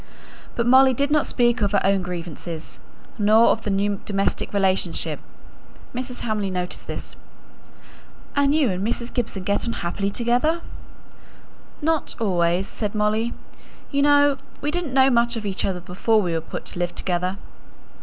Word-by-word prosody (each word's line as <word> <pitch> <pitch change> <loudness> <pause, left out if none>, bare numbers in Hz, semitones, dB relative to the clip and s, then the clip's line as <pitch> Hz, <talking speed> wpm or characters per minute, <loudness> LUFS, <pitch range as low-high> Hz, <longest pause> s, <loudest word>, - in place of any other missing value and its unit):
But 235 - 0
Molly 260 +1 +6
did 280 +3 0
not 300 -1 +3
speak 240 -1 +2
of 205 0 +1
her 200 - +4
own 195 0 +3
grievances, 170 -2 -6 0.4
nor 215 +2 +5
of 225 - +1
the 210 - -4
new 200 0 0
domestic 195 -1 -1
relationship. 190 -3 +1 0.7
Mrs. 250 0 -5
Hamley 210 -3 -1
noticed 180 -1 -4
this. - - -6 1.2
"And 285 0 +3
you 285 -9 +3
and 185 +1 -3
Mrs. 235 +2 -2
Gibson 215 -6 -2
get 200 +4 0
on 230 - -1
happily 195 +3 -1
together?" 245 +10 +1 1.2
"Not 320 0 0
always," 180 -3 +1
said 210 -1 -4
Molly. 215 +2 0 0.6
"You 280 -1 +1
know 285 -1 +5 0.2
we 295 - -1
didn't 330 -6 -2
know 265 0 +6
much 235 0 +3
of 220 -2 -5
each 195 -2 -1
other 180 -2 -2
before 195 +5 +1
we 180 -5 -1
were 165 - 0
put - - -7
to - - -5
live 175 0 -2
together." 180 +1 -1
215 Hz, 160 wpm, -23 LUFS, 190-250 Hz, 1.2 s, Molly